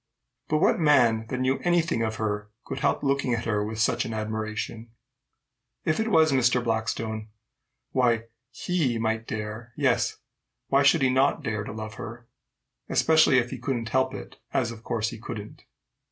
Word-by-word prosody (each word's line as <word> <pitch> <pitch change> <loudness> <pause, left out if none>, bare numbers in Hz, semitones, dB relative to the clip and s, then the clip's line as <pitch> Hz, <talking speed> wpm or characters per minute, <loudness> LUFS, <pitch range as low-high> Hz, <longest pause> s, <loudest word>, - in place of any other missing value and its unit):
But 155 - +2
what 170 - +3
man 120 -8 +4
that 130 - -3
knew 130 +1 +1
any 175 0 +3
thing 115 -8 -1
of 110 -1 -1
her 105 -1 -2 0.2
could - - -5
help 140 +1 +1
looking 140 -3 +1
at 115 - -4
her 105 -2 0
with 110 +1 -5
such 110 - +2
an 115 - -4
admiration? 110 +1 -4 1.0
If 155 - +1
it 220 - 0
was 160 -7 +4
Mr. 125 -2 +3
Blackstone 110 -1 -2 0.6
why, 120 -4 +2 0.3
he 135 -3 -1
might 110 0 -1
dare 110 +2 -5
yes, - - +1 0.5
why 140 +1 +4
should 140 +1 +4
he 130 - +4
not 135 +2 +2
dare 110 -1 -2
to - - -6
love 110 0 -6
her? 120 +2 -8 0.6
especially 160 -4 +5
if 120 -1 +1
he 130 - -5
couldn't 120 -3 -2
help 130 +2 +1
it, - - -9
as, 120 -3 0
of 115 -1 -11
course, 110 -2 -1
he 115 - -8
couldn't. 105 -2 -8
115 Hz, 175 wpm, -26 LUFS, 110-135 Hz, 1.0 s, especially